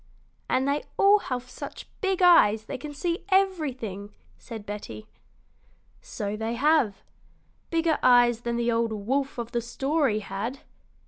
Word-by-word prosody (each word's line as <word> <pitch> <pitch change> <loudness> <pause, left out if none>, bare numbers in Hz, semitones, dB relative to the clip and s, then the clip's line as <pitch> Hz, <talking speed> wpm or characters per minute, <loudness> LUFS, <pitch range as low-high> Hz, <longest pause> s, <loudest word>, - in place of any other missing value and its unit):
"And 260 +1 +1
they 285 +1 0
all 405 +1 +6
have 255 -7 -4
such - - -9
big 385 -2 0
eyes 220 -12 +6
they - - -6
can 300 - -7
see 335 +4 -3
everything," 275 - 0 0.3
said 220 - -9
Betty. 200 - -7 1.0
"So 205 0 -5
they 225 +2 -3
have 275 -6 +2 0.7
bigger 330 -2 +1
eyes 240 -2 +5
than 235 0 -2
the 235 0 0
old 230 0 +1
wolf 260 +7 -2
of 235 0 -5
the 235 - -1
story 265 -1 0
had." 210 +8 -5
245 Hz, 140 wpm, -26 LUFS, 220-305 Hz, 1.0 s, all